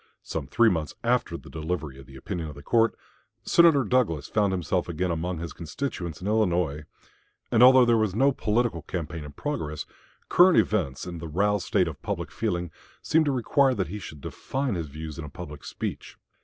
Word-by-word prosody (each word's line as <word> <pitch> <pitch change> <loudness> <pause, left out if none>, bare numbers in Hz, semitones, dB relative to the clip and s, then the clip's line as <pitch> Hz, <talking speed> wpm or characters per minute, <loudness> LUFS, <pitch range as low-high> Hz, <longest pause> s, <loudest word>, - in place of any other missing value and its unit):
Some 75 -5 -4
three 110 +10 +4
months 80 -4 -3
after - - +1
the - - -15
delivery 80 -4 -4
of 65 - -13
the 70 - -14
opinion 85 +4 -5
of 75 - -8
the 70 - -11
court, 115 - +3 0.5
Senator 165 -5 +5
Douglas 110 - +1
found 105 -2 +2
himself 90 0 -1
again 90 +2 -1
among 85 +2 -2
his 85 0 -6
constituents 85 - -5
in - - -6
Illinois, 90 -8 +1 0.7
and 115 -2 +4
although 130 0 +8
there 120 -1 +4
was 105 -3 0
no 135 +5 +4
political 115 - 0
campaign 80 -2 -5
in 75 -1 -9
progress, 75 - -4 0.4
current 180 0 +6
events 75 -11 +1
and 85 -2 -6
the 85 - -5
roused 100 +4 0
state 90 - +2
of 80 -4 -7
public - - -4
feeling 85 -1 -2 0.3
seemed 160 0 +3
to 145 - +2
require 130 +1 +2
that 95 -5 -2
he 105 +3 -5
should 75 -7 -9
define 135 - -3
his 85 -4 -3
views 80 +2 -8
in - - -5
a 75 - -7
public 75 -1 -9
speech. - - -6
90 Hz, 195 wpm, -26 LUFS, 80-115 Hz, 0.7 s, although